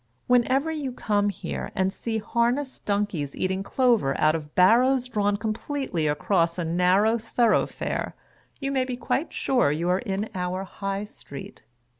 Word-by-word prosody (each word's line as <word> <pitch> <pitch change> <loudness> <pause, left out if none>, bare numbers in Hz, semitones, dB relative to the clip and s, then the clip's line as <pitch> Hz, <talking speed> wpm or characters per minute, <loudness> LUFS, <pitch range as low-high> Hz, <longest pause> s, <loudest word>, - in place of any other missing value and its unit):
Whenever 255 +5 +3
you 295 -4 -3
come 205 -4 0
here, 195 - -5
and 190 0 +1
see 225 +1 -3
harnessed 240 +5 -1
donkies 200 -9 -1
eating 190 +1 -1
clover 230 - +2
out 155 0 +4
of 150 -2 -5
barrows 245 +7 +4
drawn 205 -4 0
completely 220 - -2
across 170 +3 +1
a 175 - -2
narrow 185 +7 +3
thorough 230 0 +2
fare, - - -4 0.4
you 275 -1 -2
may 265 -2 +1
be 255 -1 -4
quite 270 +6 -1
sure 245 - +2
you 165 +4 -1
are 180 +1 +2
in 195 +2 -2
our 185 +1 -2
High 195 +1 -4
Street. 140 -9 -11
205 Hz, 155 wpm, -25 LUFS, 180-245 Hz, 0.4 s, out